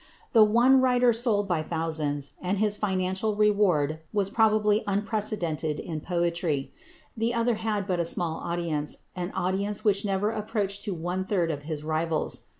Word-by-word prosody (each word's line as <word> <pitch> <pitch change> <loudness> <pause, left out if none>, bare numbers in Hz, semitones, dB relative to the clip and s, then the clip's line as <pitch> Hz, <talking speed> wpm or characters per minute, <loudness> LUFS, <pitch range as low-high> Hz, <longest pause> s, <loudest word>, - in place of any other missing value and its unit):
The 225 -3 +8
one 240 +5 +5
writer 250 -2 +4
sold 220 -3 +1
by 175 -4 0
thousands, 155 -3 -2
and 185 +2 -1
his 210 0 +2
financial 190 +1 -1
reward 195 -8 +2
was 200 -2 0
probably 215 -1 +3
unprecedented 200 -7 -1
in 155 -2 -5
poetry; 170 -5 -1 0.4
the 230 +2 0
other 235 +1 +2
had 215 -2 -2
but 185 -3 -1
a - - +2
small 165 -1 -1
audience, 165 -4 -3
an 180 -1 -3
audience 200 +4 -1
which 200 -2 +3
never 205 +1 0
approached 210 -2 -2
to 200 -4 -2
one 175 +3 -2
third 180 -4 0
of 145 -2 -5
his 150 -2 -4
rival's. 160 +1 -1
195 Hz, 155 wpm, -27 LUFS, 165-215 Hz, 0.4 s, The